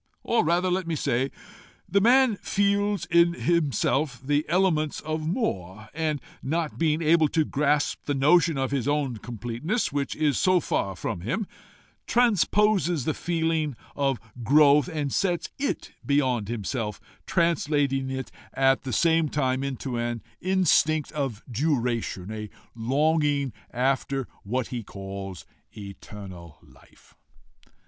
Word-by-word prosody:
Or 235 Hz, -, +2 dB
rather 175 Hz, +3 st, +1 dB
let 185 Hz, -1 st, -1 dB
me 165 Hz, -, -1 dB
say, 135 Hz, -2 st, 0 dB, 0.6 s
the 200 Hz, +3 st, +2 dB
man 250 Hz, +1 st, +5 dB
feels 200 Hz, -1 st, 0 dB
in 170 Hz, 0 st, +4 dB
himself 145 Hz, -, 0 dB
the 145 Hz, +3 st, 0 dB
elements 170 Hz, -4 st, +1 dB
of 155 Hz, +1 st, -3 dB
more, 105 Hz, -, -3 dB
and 155 Hz, -2 st, -1 dB, 0.2 s
not 160 Hz, +2 st, -2 dB
being 160 Hz, 0 st, +1 dB
able 160 Hz, 0 st, +4 dB
to 160 Hz, +1 st, +1 dB
grasp 145 Hz, 0 st, 0 dB
the 145 Hz, -, -1 dB
notion 150 Hz, +2 st, +4 dB
of 135 Hz, 0 st, -1 dB
his 135 Hz, -3 st, -1 dB
own 145 Hz, -5 st, 0 dB
completeness, 120 Hz, -, -3 dB
which 140 Hz, -1 st, -2 dB
is 150 Hz, -4 st, +1 dB
so 185 Hz, -1 st, +4 dB
far 100 Hz, -, -1 dB
from 85 Hz, -, -4 dB
him, 190 Hz, -, -2 dB, 0.6 s
transposes 210 Hz, -, +2 dB
the 155 Hz, -, +1 dB
feeling 160 Hz, -4 st, -1 dB, 0.2 s
of 135 Hz, -4 st, 0 dB, 0.2 s
growth 145 Hz, +3 st, +5 dB
and 150 Hz, -6 st, -3 dB
sets 180 Hz, -3 st, 0 dB
it 280 Hz, -, -2 dB
beyond 130 Hz, -7 st, +1 dB
himself, 110 Hz, -1 st, -3 dB, 0.3 s
translating 145 Hz, -5 st, +1 dB
it 130 Hz, -1 st, -4 dB, 0.2 s
at 135 Hz, 0 st, +3 dB
the 130 Hz, -3 st, -5 dB
same 160 Hz, +6 st, +3 dB
time 130 Hz, -2 st, 0 dB
into 130 Hz, -2 st, -3 dB
an 120 Hz, -1 st, -3 dB, 0.2 s
instinct 160 Hz, -5 st, +2 dB
of 135 Hz, -8 st, -3 dB
duration, 120 Hz, -, -1 dB
a 105 Hz, -1 st, -6 dB, 0.2 s
longing 140 Hz, +2 st, +1 dB, 0.2 s
after 135 Hz, +1 st, -1 dB
what 120 Hz, +4 st, -2 dB
he 125 Hz, -2 st, -4 dB
calls 95 Hz, -2 st, -8 dB, 0.3 s
eternal 100 Hz, -5 st, -10 dB
life. -, -, -22 dB
145 Hz, 130 wpm, -26 LUFS, 125-165 Hz, 0.6 s, man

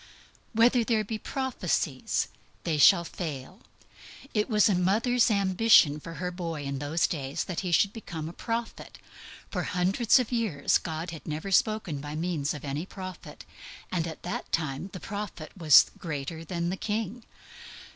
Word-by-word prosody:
"Whether 235 Hz, +2 st, +4 dB
there 220 Hz, -2 st, +1 dB
be 215 Hz, +1 st, -4 dB
prophecies, 265 Hz, +1 st, -1 dB, 0.4 s
they 160 Hz, -3 st, 0 dB
shall 175 Hz, +4 st, +7 dB
be -, -, -10 dB
done 175 Hz, -, -1 dB, 0.2 s
away." 185 Hz, -, -19 dB, 0.8 s
It 210 Hz, +1 st, +1 dB
was 210 Hz, -2 st, +4 dB
the 210 Hz, -, +4 dB
mother's 220 Hz, +8 st, +3 dB
ambition 195 Hz, -6 st, +5 dB
for 165 Hz, +2 st, -9 dB
her 180 Hz, +1 st, -3 dB
boy 165 Hz, -4 st, -4 dB
in 140 Hz, -1 st, -3 dB
those 150 Hz, +4 st, +1 dB
days 140 Hz, -4 st, -2 dB
that 180 Hz, -, -4 dB
he 180 Hz, -2 st, -3 dB
should 200 Hz, +4 st, +3 dB
become 165 Hz, -8 st, -6 dB
a 165 Hz, -, -7 dB
prophet. 230 Hz, +4 st, -5 dB, 0.5 s
For -, -, -1 dB
hundreds 190 Hz, +7 st, +3 dB
of 250 Hz, -2 st, 0 dB
years 215 Hz, -12 st, +1 dB
God 160 Hz, +1 st, -5 dB
had 160 Hz, -, -10 dB
never 155 Hz, +5 st, -4 dB
spoken 190 Hz, -8 st, +1 dB
by 145 Hz, +1 st, -6 dB
means 155 Hz, -3 st, -1 dB
of 150 Hz, -, -8 dB
any 145 Hz, +6 st, -3 dB
prophet, 185 Hz, -2 st, -9 dB, 0.5 s
and 170 Hz, -2 st, 0 dB
at 160 Hz, -, -8 dB
that 180 Hz, -, -5 dB
time 155 Hz, +2 st, -2 dB
the 185 Hz, -, -7 dB
prophet 200 Hz, -5 st, -6 dB
was 160 Hz, -6 st, +6 dB
greater 160 Hz, 0 st, -5 dB
than 170 Hz, +1 st, -2 dB
the 190 Hz, -, -3 dB
king. 220 Hz, +2 st, -3 dB
180 Hz, 165 wpm, -28 LUFS, 160-210 Hz, 0.8 s, shall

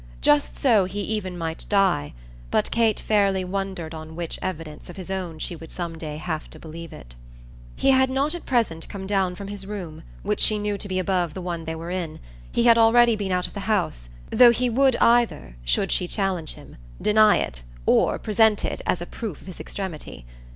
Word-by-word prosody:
Just 145 Hz, -, +3 dB
so 225 Hz, -8 st, +4 dB
he 200 Hz, +3 st, -4 dB
even 195 Hz, -3 st, -3 dB
might 165 Hz, -1 st, -4 dB
die, 195 Hz, -, +2 dB, 0.4 s
but -, -, +1 dB
Kate 225 Hz, -2 st, +2 dB
fairly 200 Hz, -3 st, +2 dB
wondered 185 Hz, -3 st, -4 dB
on 160 Hz, 0 st, -8 dB
what 170 Hz, -1 st, -4 dB
evidence 165 Hz, -5 st, -6 dB
of 175 Hz, -, -10 dB
his 190 Hz, 0 st, -7 dB
own 180 Hz, -4 st, -4 dB
she 170 Hz, -, -4 dB
would 165 Hz, 0 st, -11 dB
some 170 Hz, -2 st, -5 dB
day 155 Hz, -2 st, -6 dB
have 155 Hz, 0 st, -4 dB
to -, -, -11 dB
believe 165 Hz, +1 st, -9 dB
it. -, -, -12 dB, 0.6 s
He -, -, +3 dB
had 265 Hz, 0 st, +4 dB
not 275 Hz, +4 st, 0 dB
at 345 Hz, -, -7 dB
present 225 Hz, -11 st, 0 dB
come 195 Hz, -1 st, -6 dB
down 190 Hz, -2 st, 0 dB
from 200 Hz, +1 st, -7 dB
his 200 Hz, -1 st, -5 dB
room, 175 Hz, -7 st, -6 dB, 0.2 s
which 210 Hz, +1 st, -1 dB
she 215 Hz, -, +3 dB
knew 210 Hz, 0 st, -1 dB
to 200 Hz, -, -5 dB
be 185 Hz, -1 st, -2 dB
above 180 Hz, -4 st, 0 dB
the -, -, -4 dB
one 170 Hz, -2 st, -4 dB
they 160 Hz, 0 st, -3 dB
were 165 Hz, +2 st, -6 dB
in: 175 Hz, -4 st, -4 dB, 0.3 s
he 235 Hz, -, +1 dB
had 230 Hz, -1 st, +6 dB
already 230 Hz, +1 st, +6 dB
been 200 Hz, -2 st, -3 dB
out 180 Hz, 0 st, +1 dB
of -, -, -7 dB
the 205 Hz, -, -5 dB
house, 170 Hz, -, 0 dB, 0.2 s
though 245 Hz, -1 st, +8 dB
he 245 Hz, +1 st, +1 dB
would 265 Hz, +1 st, +4 dB
either, 230 Hz, -, +2 dB
should -, -, +1 dB
she 180 Hz, -, +1 dB
challenge 185 Hz, -5 st, -2 dB
him, -, -, -14 dB, 0.2 s
deny 215 Hz, 0 st, +5 dB
it -, -, -3 dB, 0.2 s
or -, -, +3 dB
present 220 Hz, -1 st, +3 dB
it -, -, -3 dB
as 175 Hz, -, +1 dB
a -, -, -6 dB
proof 205 Hz, -4 st, -6 dB
of -, -, -17 dB
his 185 Hz, -2 st, -9 dB
extremity. 160 Hz, -, -6 dB
190 Hz, 210 wpm, -24 LUFS, 165-215 Hz, 0.6 s, though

